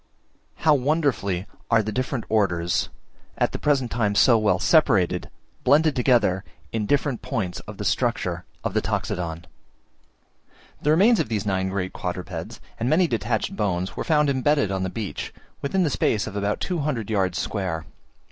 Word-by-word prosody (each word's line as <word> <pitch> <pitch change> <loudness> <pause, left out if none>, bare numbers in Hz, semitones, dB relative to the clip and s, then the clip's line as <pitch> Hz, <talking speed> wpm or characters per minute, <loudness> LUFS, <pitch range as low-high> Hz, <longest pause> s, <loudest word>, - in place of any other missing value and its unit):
How 155 - +3
wonderfully 130 - 0 0.2
are 115 -1 +4
the 110 - -3
different 125 +1 -2
Orders, 90 -6 +1 0.5
at - - +1
the - - -5
present 135 -5 +1
time 105 -3 0
so 120 +3 +6
well 105 -4 +3
separated, 105 - +3 0.3
blended 155 +1 +4
together 115 -7 +3 0.3
in 110 -2 -1
different 140 -2 +1
points 95 -5 -3
of - - -8
the - - -5
structure - - 0 0.2
of - - -2
the - - +2
Toxodon! 85 -1 -3 1.4
The 150 - 0
remains 200 +9 +5
of - - 0
these 105 -3 -1
nine 95 -1 0
great 95 -1 -3
quadrupeds, 90 -2 -5 0.2
and 120 - 0
many 175 +5 +4
detached 115 -5 -1
bones, 95 -3 -1
were - - -3
found 150 -2 +3
embedded 140 -4 +2
on 95 -1 -1
the 95 - -1
beach, 105 0 -5 0.3
within 185 +7 +1
the 155 - +1
space 105 -4 +1
of 105 - -7
about 100 0 -1
200 145 - -2
yards 95 -4 +1
square. 90 -6 -2
110 Hz, 160 wpm, -24 LUFS, 95-140 Hz, 1.4 s, so